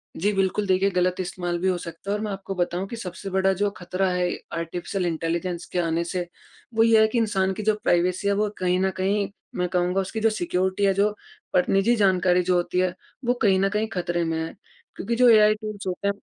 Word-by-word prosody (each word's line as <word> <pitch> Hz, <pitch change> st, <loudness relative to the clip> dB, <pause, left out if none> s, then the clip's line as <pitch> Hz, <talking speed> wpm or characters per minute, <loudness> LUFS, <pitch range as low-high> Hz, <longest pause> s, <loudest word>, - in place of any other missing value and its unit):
जी 205 Hz, +5 st, +1 dB
बिल्कुल 195 Hz, +1 st, 0 dB
देखिए 190 Hz, +1 st, +3 dB
गलत 180 Hz, 0 st, +1 dB
इस्तेमाल 175 Hz, -1 st, -3 dB
भी 185 Hz, -, 0 dB
हो 185 Hz, -1 st, +2 dB
सकता 170 Hz, +2 st, -8 dB
है -, -, +1 dB
और -, -, -6 dB
मैं 210 Hz, -, -3 dB
आपको 195 Hz, 0 st, -5 dB
बताऊँ 180 Hz, +1 st, -1 dB
कि 235 Hz, -, -6 dB
सबसे 195 Hz, -2 st, -6 dB
बड़ा 190 Hz, 0 st, +2 dB
जो 205 Hz, +2 st, 0 dB
खतरा 185 Hz, +2 st, -1 dB
है, 180 Hz, 0 st, 0 dB, 0.2 s
आर्टिफिशियल 175 Hz, +3 st, -3 dB
इंटेलिजेंस 170 Hz, +1 st, -2 dB
के 180 Hz, -, 0 dB
आने 165 Hz, 0 st, 0 dB
से। 175 Hz, 0 st, -3 dB, 0.5 s
वो 225 Hz, 0 st, +4 dB
ये 225 Hz, -1 st, +5 dB
है, 220 Hz, -, +5 dB
कि 220 Hz, -, -2 dB
इंसान 195 Hz, -4 st, +1 dB
की 210 Hz, -, -5 dB
जो 215 Hz, 0 st, +2 dB
प्राइवेसी 180 Hz, +3 st, +1 dB
है 200 Hz, -, +3 dB
वो 210 Hz, +1 st, +1 dB
कहीं 180 Hz, 0 st, +1 dB
न 190 Hz, 0 st, +1 dB
कहीं 200 Hz, +2 st, +1 dB, 0.3 s
मैं 180 Hz, -1 st, 0 dB
कहूँगा 180 Hz, +1 st, +1 dB
उसकी 195 Hz, +4 st, -4 dB
जो 225 Hz, +1 st, +3 dB
सिक्योरिटी 190 Hz, -1 st, 0 dB
है 195 Hz, -, +4 dB
जो, 205 Hz, +2 st, +2 dB, 0.4 s
पर 180 Hz, -1 st, +4 dB
निज़ी 195 Hz, +5 st, +3 dB
जानकारी 185 Hz, -3 st, +3 dB
जो 180 Hz, 0 st, +1 dB
होती 175 Hz, +1 st, 0 dB
है, 185 Hz, -1 st, +1 dB, 0.3 s
वो 245 Hz, -, +3 dB
कहीं 195 Hz, -3 st, +4 dB
न 195 Hz, +1 st, +2 dB
कहीं 210 Hz, +2 st, -1 dB
खतरे 175 Hz, -1 st, -1 dB
में 165 Hz, -1 st, -1 dB
है 165 Hz, -, -6 dB, 0.4 s
क्योंकि 235 Hz, +3 st, -2 dB
जो 250 Hz, +1 st, +6 dB
एआई 215 Hz, -2 st, +7 dB
टूल्स 215 Hz, -2 st, -7 dB
होते 185 Hz, +2 st, -2 dB
हैं। 200 Hz, -, +2 dB
190 Hz, 230 wpm, -24 LUFS, 180-205 Hz, 0.5 s, एआई